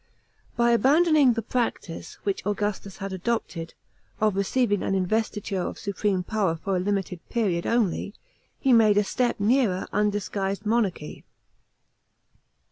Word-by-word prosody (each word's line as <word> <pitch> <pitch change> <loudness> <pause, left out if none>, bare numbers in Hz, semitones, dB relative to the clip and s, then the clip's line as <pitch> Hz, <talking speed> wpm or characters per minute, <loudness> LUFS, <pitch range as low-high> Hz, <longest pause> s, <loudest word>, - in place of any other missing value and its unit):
By 235 0 +4
abandoning 290 +2 +4
the 230 -1 -3
practice, 230 -8 -3
which 200 -1 -2
Augustus 205 -1 -3
had 195 0 -5
adopted, 185 -4 -3 0.4
of 215 -2 +2
receiving 205 +1 +1
an 195 - 0
investiture 200 0 -1
of - - -4
supreme 200 -2 -1
power 195 -4 0
for 190 +4 -2
a - - +1
limited 190 -2 -2
period 190 -8 0
only, 215 -2 0 0.4
he 265 -3 +3
made 215 -3 +5
a 205 - +4
step 245 +4 -1
nearer 210 -3 +2
undisguised 205 -1 -1
monarchy. 210 -8 -1
205 Hz, 125 wpm, -25 LUFS, 190-230 Hz, 0.4 s, made